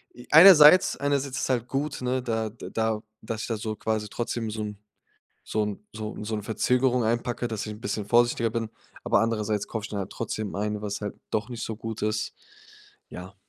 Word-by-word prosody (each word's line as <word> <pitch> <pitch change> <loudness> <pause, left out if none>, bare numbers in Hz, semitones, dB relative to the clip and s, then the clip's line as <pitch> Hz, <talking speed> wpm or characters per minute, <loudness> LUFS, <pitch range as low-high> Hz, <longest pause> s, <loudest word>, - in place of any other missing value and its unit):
i 125 0 -13
einerseits 160 0 +9
einerseits 140 -1 -1
ist - - -2
halt 120 -2 0
gut, 140 +1 -3
ne, 125 +1 0
da 110 -2 -1
d 115 - -10
da 110 -1 0 0.2
dass 110 0 -4
ich - - -4
da 115 - -2
so 110 0 -4
quasi 110 -1 -2
trotzdem 115 -1 -3
so 110 0 -4
'n 105 -1 -6 0.7
so 110 - -1
'n 105 -1 -4 0.2
so 110 0 -5
so 110 0 -2
'ne 105 - -4
Verzögerung 125 +3 +1
einpacke, 120 +1 -1
dass 110 -2 -3
ich 105 - -5
'n 105 - -11
bisschen 105 0 -3
vorsichtiger 120 0 +3
bin. 115 0 -2 0.4
Aber - - +3
andererseits 110 -2 -1
kaufe 110 -2 -4
ich - - -5
dann 100 - -3
halt 95 - -5
trotzdem 110 -2 -4
ein, 105 +1 -2
was 100 -1 -4
halt 105 - -4 0.2
doch 110 +3 -1
nicht 120 -1 -6
so 110 - -5
gut 115 0 -6
ist. 110 0 -1 0.8
Ja. - - -9
110 Hz, 210 wpm, -26 LUFS, 105-120 Hz, 0.8 s, einerseits